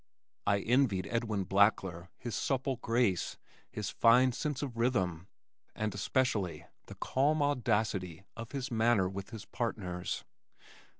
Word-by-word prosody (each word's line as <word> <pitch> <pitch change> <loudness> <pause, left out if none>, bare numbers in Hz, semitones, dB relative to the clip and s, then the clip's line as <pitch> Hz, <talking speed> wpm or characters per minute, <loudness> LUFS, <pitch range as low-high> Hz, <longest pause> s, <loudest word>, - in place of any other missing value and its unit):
I 100 -1 +3
envied 115 -6 +2
Edwin 110 -4 0
Blackler 95 -3 +2
his 120 -2 -6
supple 135 -1 0
grace, 115 -6 0 0.3
his 105 -2 -4
fine 125 +2 +5
sense 145 +2 -3
of 130 -5 -4
rhythm, 95 -8 0 0.5
and 110 -2 -2
especially 105 -3 0 0.2
the - - -9
calm 145 +3 +1
audacity 110 - 0
of 115 0 -7
his 135 -3 -4
manner 115 -4 +3
with 95 +1 -6
his 110 -3 -8
partners. 90 - -3
110 Hz, 125 wpm, -32 LUFS, 95-125 Hz, 0.5 s, fine